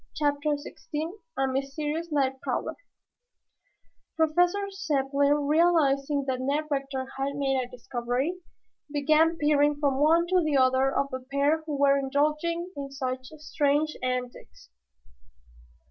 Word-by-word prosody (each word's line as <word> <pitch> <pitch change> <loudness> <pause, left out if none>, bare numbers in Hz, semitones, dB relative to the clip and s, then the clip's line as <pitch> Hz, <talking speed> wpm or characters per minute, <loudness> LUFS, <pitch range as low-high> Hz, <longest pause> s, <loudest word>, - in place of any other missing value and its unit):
CHAPTER 290 0 +1
XVI 300 +2 -6 0.3
A 270 - +2
MYSTERIOUS 295 +5 -2
NIGHT 265 -2 0
PROWLER - - -2 1.4
Professor 355 +5 +2
Zepplin, 285 -3 +1
realizing 295 -3 +2
that 260 -2 -1
Ned 285 +4 0
Rector 275 -1 -2
had 280 +1 -1
made 270 -2 +1
a 245 - -9
discovery, 250 +7 -3 0.5
began 310 +3 +3
peering 295 -1 +3
from 280 -2 +1
one 325 +3 +4
to 365 0 +2
the 305 -3 +1
other 260 +1 +3
of 275 0 -1
the 260 - -3
pair 285 +3 +2
who 295 -2 -2
were 280 0 +4
indulging 305 +6 0
in 280 -1 -5
such 260 -2 -4
strange 300 0 0
antics. 250 - -5
285 Hz, 125 wpm, -27 LUFS, 270-310 Hz, 1.4 s, one